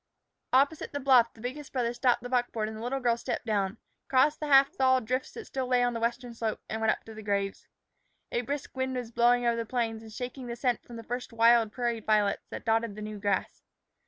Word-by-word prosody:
Opposite 280 +5 +2
the 285 - -2
bluff 255 -4 +5
the 225 - -14
biggest 265 +4 -6
brother 240 -3 0
stopped 245 -1 +2
the 245 - -5
buckboard 240 -3 0
and 220 - -6
the 220 - -8
little 255 +3 -2
girl 240 -2 +2
stepped 235 - -4
down, 200 -3 0 0.3
crossed 280 +3 +3
the 300 - -3
half 275 -1 +6
thawed 260 -2 +3
drifts 255 +3 -2
that 455 - -8
still 265 -1 -3
lay 250 -1 +3
on 245 0 +1
the 230 - -3
western 240 +1 -2
slope, 225 -2 -2
and 220 +1 -4
went 220 - +2
up - - -4
to 225 - -11
the 220 - -9
graves. 200 -1 -2 0.6
A 240 - 0
brisk 280 +3 -5
wind 260 0 -1
was 245 -2 -4
blowing 240 +1 +3
over 235 -1 +2
the 230 - -1
plains 225 -1 -2
and 220 -1 -12
shaking 250 +2 -6
the 235 - -4
scent 245 -1 0
from 240 - -12
the 230 - -7
first 245 +3 -5
wild 230 -1 +4
prairie 240 -1 -1
violets 210 -2 +1
that - - -7
dotted 225 -2 +1
the 215 - -7
new 210 -1 -6
grass. 200 -2 -1
240 Hz, 240 wpm, -29 LUFS, 225-255 Hz, 0.6 s, half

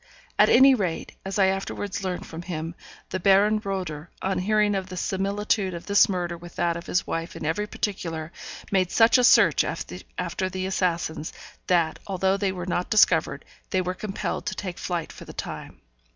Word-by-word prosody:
At - - +7
any 265 +2 +7
rate, 185 -9 -2
as 195 +1 -4
I 195 - +5
afterwards 195 +1 -2
learnt 185 -1 -3
from 165 +1 -7
him, 165 -2 -5 0.4
the 185 - -1
Baron 200 +3 +4
Roeder, 180 -5 -4
on 190 0 -1
hearing 210 +2 +2
of 190 -1 -2
the 185 - -7
similitude 195 0 0
of 170 - -8
this 200 0 +5
murder 175 -2 -2
with 170 0 -12
that 170 -1 +1
of 170 - -7
his 180 - +1
wife 165 0 -4
in - - -6
every 185 +7 -1
particular, 165 -7 -4 0.4
made 185 -2 +2
such 230 +5 +5
a - - +3
search - - +6
after 185 0 -4
the 185 0 -3
assassins, 170 -4 -1 0.4
that, 170 -3 +2
although 190 0 +1
they 200 -1 0
were 180 -2 -5
not 180 0 -1
discovered, 215 - +3 0.2
they 185 - +1
were 180 0 -2
compelled 195 +1 -4
to 190 - -2
take 185 -3 -5
to - - -9
flight 175 -3 -3
for - - -11
the - - -10
time. - - -7
185 Hz, 190 wpm, -25 LUFS, 175-200 Hz, 0.4 s, At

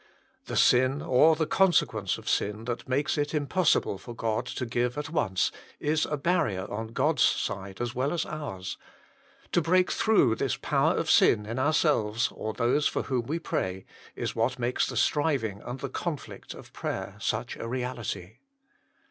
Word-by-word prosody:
The - - -5
sin, 130 +3 +4
or 155 +5 +5
the 160 0 0
consequence 125 - +2
of - - -13
sin, 105 +2 0
that 120 +1 -4
makes 140 +3 +1
it 145 +2 -1
impossible 150 - +1
for 120 - -9
God 110 -1 -1
to 125 - -3
give 120 +2 -1
at 150 +1 -4
once, 95 - +1 0.3
is 155 +1 +1
a 150 - -2
barrier 135 - 0
on 110 +2 -3
God 140 +7 0
s - - +6
side 95 0 -2
as 120 -1 -2
well 130 +3 0
as 170 -2 -1
ours; 95 -12 -6 0.7
to 175 - +3
break 180 +3 +3
through 145 - +3
this - - -1
power - - +1
of - - +1
sin 105 - +5
in 115 +4 -4
ourselves, 130 -7 +2
or 110 - -4
those 125 +6 +2
for - - -1
whom 125 -4 -2
we 160 - -1
pray, 95 - -3 0.3
is - - -3
what 115 +3 0
makes 125 0 0
the - - -4
striving 135 -10 +1
and 125 +2 -7
the 140 - -2
conflict 155 +2 -5
of - - -13
prayer 100 - -4
such 110 +2 -2
a - - -5
reality. 120 -7 -4
125 Hz, 175 wpm, -28 LUFS, 110-150 Hz, 0.7 s, s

